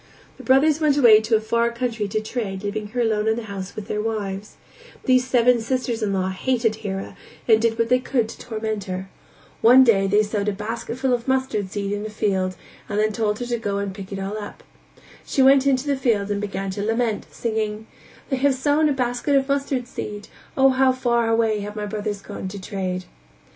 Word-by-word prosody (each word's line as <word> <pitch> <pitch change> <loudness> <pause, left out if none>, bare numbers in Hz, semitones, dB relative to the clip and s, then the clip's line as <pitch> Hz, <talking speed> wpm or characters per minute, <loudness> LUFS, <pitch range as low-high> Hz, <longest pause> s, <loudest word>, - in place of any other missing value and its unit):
The - - -11
brothers 290 +4 +4
went 295 -2 +3
away 225 -6 +7
to 220 +1 +1
a - - +3
far 235 +2 +1
country 235 -3 -2
to 210 +2 -1
trade 215 -4 -4
leaving 210 +1 -3
her 245 +4 -2
alone 220 -2 +1
in 220 - +3
the 235 - -5
house 200 -2 -7
with 215 -1 -7
their 210 - -2
wives; 210 -2 -4 0.5
these 255 -1 +3
seven 245 -1 +4
sisters 245 -1 -2
in 210 -2 0
law 190 -1 0
hated 225 +3 0
Hira 195 -3 -5 0.3
and 220 -2 +5
did 230 0 +1
what 230 0 +1
they 250 0 +4
could 250 -3 0
to - - -9
torment 220 -3 -4
her; 185 0 -5 0.5
one 250 +3 +8
day 200 -5 +4
they 205 +2 +4
sowed 210 -1 -2
a - - -2
basketful 230 +5 -2
of 240 0 -2
mustard 260 -7 0
seed 200 0 -3
in 205 0 -2
a 215 - -4
field 190 -3 -1 0.3
and 205 - -2
then 215 +1 +2
told 210 -1 0
her 245 - -4
to 240 -1 -2
go 200 -3 -2
and 200 -1 -3
pick 195 0 -9
it 195 - -4
all 195 +2 -4
up; 205 - -9 0.6
she 270 - +1
went 270 +1 +7
to 275 0 +3
the 280 +2 -1
field 215 -6 0
and 205 0 -1
began 195 -1 -3
to 200 +2 -4
lament, 225 0 -1
singing: 220 -1 -3 0.5
"They 270 - +1
have 275 +1 +2
sown 295 +3 +2
a - - +2
basket 250 +2 0
of 270 -1 +2
mustard 275 -3 -1
seed! 210 -4 -7 0.3
Oh, 270 0 +6
how 260 0 +3
far 235 -2 +1
away 225 -2 +2
have 205 +1 -6
my 210 -1 -3
brothers 205 -1 -4
gone - - -6
to 200 +2 -7
trade." 185 -1 -4
220 Hz, 215 wpm, -23 LUFS, 205-250 Hz, 0.6 s, one